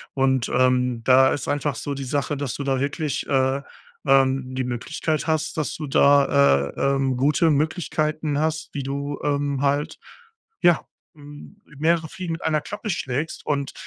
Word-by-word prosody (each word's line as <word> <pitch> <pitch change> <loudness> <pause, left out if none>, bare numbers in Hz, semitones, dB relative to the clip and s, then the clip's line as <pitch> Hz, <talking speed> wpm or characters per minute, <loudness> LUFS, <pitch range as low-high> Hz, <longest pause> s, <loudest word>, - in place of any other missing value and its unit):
Und, 130 -2 +1
ähm, 125 -2 +2
da 130 +2 +5
ist 145 - -3
einfach 145 -1 -1
so 140 +5 -4
die 140 - -5
Sache, 145 +1 -1
dass 140 -4 -3
du 140 - -4
da 135 -1 0
wirklich, 145 +2 -2
äh, 135 0 +1 0.5
ähm, 135 -1 +2
die 130 - -1
Möglichkeit 125 +6 -3
hast, 155 0 -1
dass 155 - -2
du 155 - -5
da, 70 - +4
äh, 140 0 +1
ähm, 135 -2 0
gute 150 +4 +3
Möglichkeiten 155 -1 -1
hast, 160 +1 -1
wie 140 - -3
du, 140 +1 -4
ähm, 145 -1 -1
halt, 145 +2 0 0.6
ja, 175 -1 +5 0.3
hm, 145 +7 -13 0.2
mehrere 160 +2 +1
Fliegen 175 +1 -6
mit 165 - -6
einer 155 -2 +1
Klappe 205 +5 -6
schlägst 150 -3 -3
und 140 -2 -2
140 Hz, 165 wpm, -23 LUFS, 135-155 Hz, 0.6 s, da